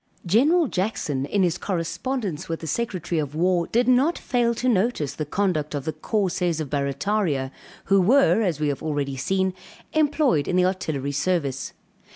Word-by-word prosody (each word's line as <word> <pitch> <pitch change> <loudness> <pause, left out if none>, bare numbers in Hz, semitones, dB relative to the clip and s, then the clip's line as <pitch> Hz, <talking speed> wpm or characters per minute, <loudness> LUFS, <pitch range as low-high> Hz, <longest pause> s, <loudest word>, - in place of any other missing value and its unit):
General 290 - +4
Jackson, 170 - -2
in 200 +5 +1
his 175 -2 0
correspondence 190 - -3
with 165 - -3
the - - -6
secretary 175 -2 -2
of 145 -1 -4
war 175 +1 +1
did 240 +1 +1
not 260 +7 +3
fail 240 -2 0
to 255 - -2
notice 205 - +1
the 155 - -4
conduct 155 -5 -1
of 140 -1 -4
the 160 - -2
"Corsairs 180 -5 -1
of 150 -4 -4
Barrataria," 140 0 -1 0.3
who 195 -1 +4
were, 250 +4 +4
as 175 -8 0
we 150 -1 +1
have 140 - -3
already 145 -3 -2
seen, 190 +7 0 0.4
employed 295 - +2
in - - 0
the 180 0 +4
artillery 155 -7 -2
service. 145 -3 -1
180 Hz, 170 wpm, -24 LUFS, 150-220 Hz, 0.4 s, General